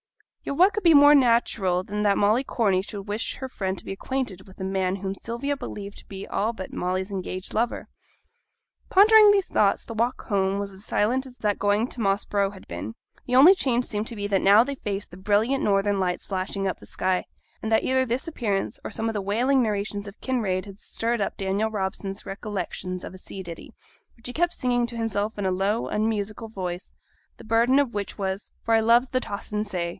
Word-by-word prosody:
Yet 280 - -4
what 375 +4 +6
could 425 - -2
be 335 -3 +6
more 290 +1 +8
natural 230 -8 +3
than 210 +2 -4
that 205 -1 +3
Molly 215 +6 +3
Corney 200 -8 +1
should 200 +1 -7
wish 210 +2 -2
her 265 - -6
friend 190 -6 -3
to - - -10
be - - -5
acquainted 200 -2 -4
with 190 - -16
the - - -6
man 190 -1 0
whom 195 0 -4
Sylvia 235 +8 -3
believed 205 -7 -7
to - - -14
be 195 0 -7
all 215 +3 -1
but 190 -5 -8
Molly's 185 +2 -2
engaged 185 -1 -4
lover? 230 +2 -1 1.0
Pondering 425 +2 +7
these 400 -2 +4
thoughts, 200 -1 +2
the - - -7
walk 235 +3 -1
home 195 -2 +1
was 200 0 -4
as 190 +1 -12
silent 250 +7 0
as 250 -1 -14
that 210 -1 -1
going 205 +3 +2
to 240 - -4
Moss 195 0 +1
Brow 200 -1 +1
had 195 -1 -13
been. 85 +6 -6 0.3
The 250 - +1
only 295 +9 +9
change 250 -9 0
seemed 210 0 -3
to 235 - -5
be 205 -1 -4
that 200 -2 +1
now 205 +3 +7
they 280 +3 -4
faced 205 -6 -5
the 180 - -11
brilliant 215 +7 +1
northern 200 0 +2
lights 180 -1 -1
flashing 195 0 -2
up 190 - -3
the - - -14
sky, 185 -1 -1 0.4
and 220 - -3
that 220 - +4
either 260 0 +2
this 255 +3 -2
appearance 215 -8 -2
or - - -4
some 225 -1 -3
of 225 - -1
the 205 - -2
whaling 245 +7 +2
narrations 205 -2 -2
of 200 +2 -11
Kinraid 210 -8 -1
had 200 0 -11
stirred 230 0 -2
up 195 - -2
Daniel 195 +3 0
Robson's 195 -1 -4
recollections 185 -2 -4
of - - -7
a 185 - -10
sea 190 0 -8
ditty, 170 -2 -10 0.4
which 230 - -21
he 250 - -4
kept 345 +3 +1
singing 245 -1 +1
to 235 -1 -7
himself 220 -1 -2
in 205 - -2
a 190 - +2
low, 195 +5 0
unmusical 215 +1 -2
voice, 180 -4 -6 0.4
the - - -13
burden 230 +4 +3
of 280 -4 +2
which 205 -1 -4
was, 195 0 -3
'for 230 - +2
I 225 - +6
loves 235 +3 +4
the 255 - +1
tossin' 210 -2 -3
say!' 180 -5 -3
210 Hz, 220 wpm, -25 LUFS, 195-240 Hz, 1.0 s, only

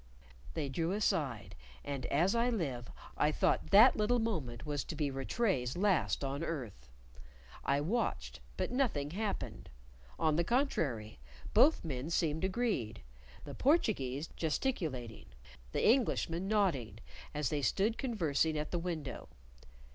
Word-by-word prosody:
They 150 -3 -1
drew 165 +6 -1
aside; 145 - -1 0.3
and, 140 -3 -3
as 170 +7 +2
I 235 +1 +2
live, 135 - -2 0.3
I 150 - +2
thought - - +1
that 220 +6 +8
little 215 +3 +2
moment 160 - -2
was 145 -1 -2
to - - -5
be 145 -3 -1
Rattray's 135 - -1
last 175 - +2
on 140 +3 -2
earth. 120 - -5 0.7
I 140 +1 +1
watched, 220 +11 -2 0.2
but - - -1
nothing 215 - 0
happened; 205 +3 -4 0.5
on 155 -1 +2
the 170 - +3
contrary, 145 - -1 0.3
both 265 - +5
men 135 -1 -3
seemed 160 -1 0
agreed, 190 - -1 0.4
the - - -7
Portuguese 165 - +1
gesticulating, 150 - -2 0.4
the - - +1
Englishman 195 -7 +2
nodding, 190 - +1 0.4
as 150 -3 0
they 150 -2 -1
stood 205 - +1
conversing 160 - +1
at 150 0 -3
the 175 - 0
window. 165 -5 -5
160 Hz, 130 wpm, -33 LUFS, 135-210 Hz, 0.7 s, that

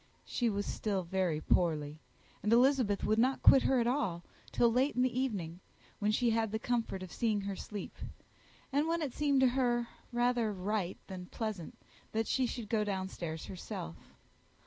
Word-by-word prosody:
She 240 -2 0
was 205 -1 -1
still 200 -4 -1
very 175 -3 0
poorly, 155 -3 +1 0.4
and 210 - 0
Elizabeth 245 -4 +4
would 215 +1 +2
not 260 +3 +2
quit 270 - +8
her 265 -1 +3
at 235 - +2
all, 220 -10 0 0.3
till 235 -1 +3
late 260 +5 +2
in 250 - +3
the 255 0 0
evening, 185 -10 -2 0.4
when 205 - +1
she 230 +2 +2
had 225 -1 +1
the 220 - 0
comfort 225 -5 -2
of 185 - -9
seeing 220 -4 0
her 200 0 -3
asleep, 205 +1 -7 0.8
and 290 +3 +2
when 335 0 0
it 270 -5 -3
appeared 285 -3 +2
to 260 - +6
her 240 -2 +1 0.2
rather 240 -2 +1
right 190 -1 -2
than 185 -2 -8
pleasant 215 -7 -5 0.4
that 225 +1 +1
she 260 +2 +1
should 235 -2 -5
go 215 0 +1
down 190 -2 -2
stairs 160 -4 -5
herself. 85 - -6
220 Hz, 180 wpm, -33 LUFS, 190-245 Hz, 0.8 s, quit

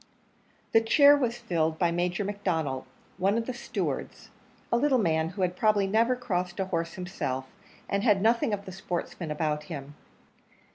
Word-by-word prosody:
The 225 - +5
chair 285 +5 +6
was 245 -4 -1
filled 165 -9 -1
by 170 -1 +2
Major 175 +3 -1
McDonnell, 165 -10 -2 0.3
one 195 +4 +2
of 230 - -1
the 255 - -3
stewards 240 - -4 0.4
a 235 - +4
little 270 +1 +3
man, 160 -7 +1
who 190 +1 -3
had 180 0 0
probably 210 -1 +3
never 225 +5 +2
crossed 180 -7 -3
a 190 - +1
horse 165 -3 -2
himself, 155 -8 -3 0.4
and 200 - 0
had 210 -3 +4
nothing 225 +2 +2
of 200 -1 -3
the 190 - -7
sportsman 175 -2 -4
about 150 0 -1
him. 145 -3 -7
190 Hz, 170 wpm, -28 LUFS, 165-225 Hz, 0.4 s, chair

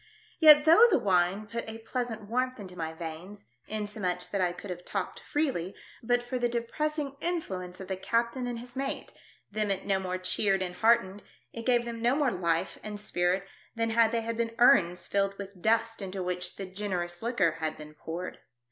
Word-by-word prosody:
Yet 300 -2 +9
though 335 +10 +8
the 380 - +4
wine 190 +1 +2
put 225 +1 -4
a 220 - -6
pleasant 225 -2 -4
warmth 255 +2 -1
into 185 -3 -9
my 160 -2 -3
veins, 165 +5 -8 0.2
insomuch 205 -4 -3
that 200 - 0
I 180 -1 +2
could 185 +2 -8
have 180 0 -6
talked - - -4
freely 260 - -1 0.3
but 245 +1 +1
for 250 +1 -3
the 240 0 +1
depress 270 +7 -2
ing 280 -2 -3
influence 190 - -3
of 190 - -7
the 190 - -2
captain 235 +5 0
and 240 -1 -3
his 245 +2 -10
mate, 270 +1 -3 0.4
them 215 0 -1
it 195 -1 -1
no 195 -1 +2
more 185 -1 -2
cheered 195 +1 +1
and 180 -1 -4
heartened, 220 -2 +3 0.3
it 230 +1 -6
gave 240 -1 +3
them 230 -1 -5
no 240 +3 +3
more 285 -4 +2
life 170 0 -1
and 210 -1 -6
spirit 185 -1 0 0.3
than 230 0 0
had 225 0 +4
they 230 0 -1
been 230 0 -2
urns 185 -9 +5
filled 195 0 0
with 200 -2 -9
dust 225 +1 +1
into 190 -1 -4
which 180 0 -3
the 195 - -5
generous 185 -3 -3
liquor 205 -9 +1
had 155 -1 -2
been 150 0 -10
poured. 165 +4 -6
210 Hz, 195 wpm, -29 LUFS, 185-235 Hz, 0.4 s, Yet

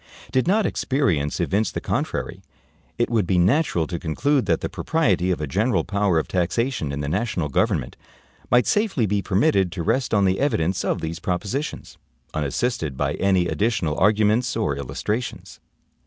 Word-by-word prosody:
Did 130 +4 +1
not 210 +3 +3
experience 85 - 0
evince 105 +4 0
the - - -3
contrary, - - -3 0.6
it 120 0 0
would 110 -6 +1
be 95 - +2
natural 90 - +2
to 85 +1 -4
conclude 130 - 0
that - - +1
the - - -1
propriety 100 - 0
of 90 - 0
a 75 - -2
general 105 - +1
power 100 -4 +1
of 80 - 0
taxation 90 - -1
in 70 +1 -3
the 70 - -3
national 90 -2 -1
government 65 -2 0 0.5
might 125 0 +4
safely 205 - +1
be 100 0 0
permitted 95 - +2
to 85 - -4
rest 120 +6 0
on 100 -2 +3
the 95 0 +1
evidence 95 - 0
of - - -1
these 80 +1 -4
propositions, 105 - -4 0.3
unassisted 75 - -2
by 70 +1 0
any 95 -1 +2
additional 100 -9 0
arguments 110 +5 +2
or 110 -11 0
illustrations. 70 - -4
100 Hz, 165 wpm, -23 LUFS, 85-120 Hz, 0.6 s, might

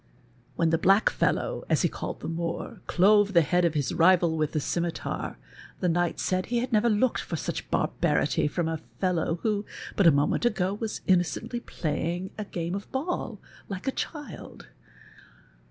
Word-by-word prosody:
AViicn 165 -1 +2
the 165 - +2
black 195 +5 +4
fellow, - - 0
as - - +3
he - - +5
called - - -6
the - - -5
Moor, 165 +1 -4
clove 205 +2 +4
tiie 170 -2 +6
head 175 +3 +2
of 165 -2 +1
his 145 -4 0
rival 170 -1 +4
with 155 -1 -1
the 155 - +1
scimitar, 170 +3 -3 0.4
the 180 - 0
knight 175 0 0
said 185 -1 0
he 240 - 0
had 240 +1 -2
never 220 +2 +4
looked 225 +3 +2
for 170 - -4
such 150 - -4
barbarity - - +1
from 165 +2 -1
a 160 -1 -3 0.2
fellow 175 -3 +1
who, 210 -2 +1 0.3
but 195 - +4
a - - +9
moment 145 +8 +1
ago, 200 -5 +1
was 215 +1 -4
iiuiocently 200 +6 +1
play 165 +1 -2
ing 185 +2 -6
a 210 - -5
game 170 -2 -4
of 200 +1 -4
l)all, 310 +7 -2 0.3
like 195 +4 -6
a - - +3
child. 295 +1 -7
180 Hz, 180 wpm, -27 LUFS, 165-210 Hz, 0.4 s, a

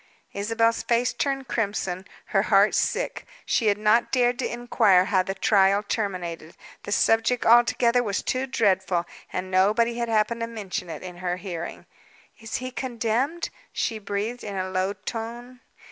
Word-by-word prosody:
Isabel's 225 +3 +1
face 240 +1 +1
turned 270 -2 -2
crimson, 200 -4 -2 0.2
her - - +2
heart - - +4
sick. - - -1 0.2
She 225 - +1
had 205 -1 +3
not 215 +3 +3
dared 245 -1 +2
to - - -1
inquire 225 -6 +3
how 190 -2 +2
the 195 +1 -4
trial 195 0 +3
terminated. 180 -7 -4 0.2
The - - -7
subject 225 +3 +2
altogether 240 +1 +5
was 205 -4 -2
too 260 +1 -1
dreadful, 190 -7 +1 0.3
and 185 +1 -4
nobody 220 +6 +2
had 235 -1 -1
happened 225 +1 +1
to 230 - -1
mention 200 -5 -5
it 160 0 -7
in 180 -1 -8
her 180 0 -2
hearing. 175 -3 -6 0.5
"Is 225 -1 -6
he 255 0 -4
condemned?" 250 +6 -2 0.2
she 220 - -2
breathed, 210 +4 -3
in 200 -2 -5
a 185 0 -3
low 185 +1 0
tone. 240 +3 -7
220 Hz, 160 wpm, -25 LUFS, 190-240 Hz, 0.5 s, altogether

